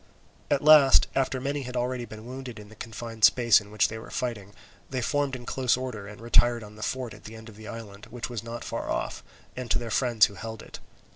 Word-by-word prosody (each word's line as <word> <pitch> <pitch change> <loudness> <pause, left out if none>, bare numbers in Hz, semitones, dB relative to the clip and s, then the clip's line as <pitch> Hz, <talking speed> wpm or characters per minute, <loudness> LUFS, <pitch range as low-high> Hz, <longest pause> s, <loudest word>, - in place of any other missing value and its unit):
At 140 - +2
last, 150 -3 +8
after 130 -1 0
many 140 +2 -2
had 125 -1 -6
been - - +1
already 125 0 -2
wounded 120 +3 -8
in 105 -1 -11
the 110 - -14
confined 115 0 -8
space 115 0 +6
in 105 - -14
which 105 -1 +2
they 110 - -6
were - - -11
fighting, 105 -5 -4 0.3
they 130 - -2
formed 140 +2 0
in 120 -1 -8
close 130 -1 +1
order 125 -6 -5
and 105 0 -10
retired 120 0 +3
on 105 0 -12
the 110 - -12
fort 125 0 -3
at 105 - -15
the 110 - -9
end 110 0 -11
of 110 - -13
the 110 +1 -11
island, 105 -2 -9
which 120 -1 -5
was 120 -4 -5
not 115 0 -6
far - - -4
off, - - -2 0.3
and 125 -2 -5
to - - +3
their 120 -2 -5
friends 120 -4 +4
who - - -6
held 110 +1 -7
it. - - -10
115 Hz, 240 wpm, -27 LUFS, 110-125 Hz, 0.3 s, last